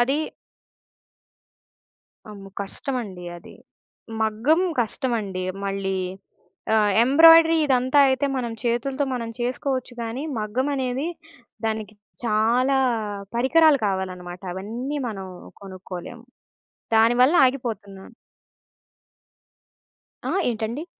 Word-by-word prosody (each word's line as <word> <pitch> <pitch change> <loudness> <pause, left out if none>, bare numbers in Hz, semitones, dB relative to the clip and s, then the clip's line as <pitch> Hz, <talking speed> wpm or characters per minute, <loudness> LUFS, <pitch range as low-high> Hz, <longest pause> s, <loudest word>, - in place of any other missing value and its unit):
అది 280 +6 +1 2.0
అమ్మో! 195 -1 -10
కష్టమండి 200 -3 -5
అది. 170 - -14 0.7
మగ్గం 225 +10 +2 0.2
కష్టమండి 220 -5 -2 0.2
మళ్ళీ. 195 -1 -2 0.8
ఆహ్, 210 -2 +3
ఎంబ్రాయిడరీ 325 +4 +7
ఇదంతా 260 +1 +2
అయితే, 265 +1 +1
మనం 240 -3 -2
చేతులతో 260 +4 0
మనం 230 -2 -4
చేసుకోవచ్చు 255 +1 -2
గాని, 230 +4 -4 0.2
మగ్గమనేది 260 +5 -1 0.6
దానికి 220 -1 -3 0.3
చాలా 235 +5 +2 0.6
పరికరాలు 300 +4 +5
కావాలన్నమాట. 185 -2 -4
అవన్నీ 235 +10 -4
మనం 195 -4 -6 0.3
కొనుక్కోలేము. 190 +4 -9 0.7
దాని 225 +2 +5
వల్ల 285 +7 +4
ఆగిపోతునాను. 225 -6 -5 2.1
ఆ! - - -2 0.2
ఏంటండి? 230 +7 -4
235 Hz, 85 wpm, -23 LUFS, 205-265 Hz, 2.1 s, ఎంబ్రాయిడరీ